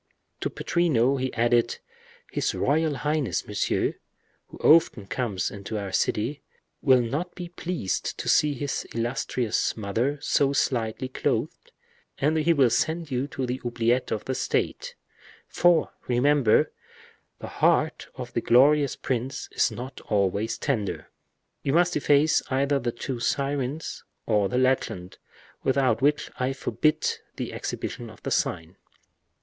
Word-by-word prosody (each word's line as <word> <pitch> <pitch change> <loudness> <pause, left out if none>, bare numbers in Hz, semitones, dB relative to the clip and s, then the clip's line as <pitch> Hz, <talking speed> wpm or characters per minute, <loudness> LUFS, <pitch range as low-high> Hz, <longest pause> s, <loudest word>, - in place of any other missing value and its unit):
To - - -1
Pittrino 140 -7 +1
he 130 0 -1
added, 120 0 +2 0.5
"His - - -1
royal 155 +1 +1
highness, 150 -2 -1
Monsieur, 105 -1 0 0.5
who - - -12
often 150 -10 +4
comes 100 -4 -2
into 100 +2 -5
our 100 -2 -4
city, 115 +8 0 0.4
will 130 -2 +5
not 150 +10 -3
be 175 -1 -6
much 175 - -37
pleased 170 - -3
to - - -5
see 150 -1 +3
his 140 +1 -3
illustrious 120 -1 -1
mother 115 +7 -1
so 140 -1 +2
slightly 120 -2 0
clothed, 130 - -2 0.5
and 150 +3 +1
he 160 +2 +3
will 135 -7 +4
send 160 -1 0
you 130 +2 -1
to 135 -3 -3
the 125 +1 -3
oubliettes 120 +1 0
of 110 - -2
the 130 - -1
state; - - -2 0.5
for, 175 -2 +3 0.2
remember, 125 -1 +3 0.7
the - - -8
heart - - +2
of - - -7
that - - -2
glorious 140 +3 +5
prince 130 +2 -3
is - - +2
not 125 +4 -8
always 100 +1 +1
tender. 115 -9 -2 0.5
You 135 - -1
must 175 +2 +3
efface 145 +1 +3
either 140 +1 +1
the 120 -1 -2
two 120 +1 -5
sirens 140 +3 -2 0.2
or 105 -3 +2
the 125 - -1
legend, 125 -8 0 0.4
without 130 -4 +2
which 145 +2 +1
I 130 +1 0
forbid 155 +3 0 0.3
the - - -5
exhibition - - -5
of - - -15
the - - -3
sign. 80 +3 -1
130 Hz, 140 wpm, -26 LUFS, 115-145 Hz, 0.7 s, will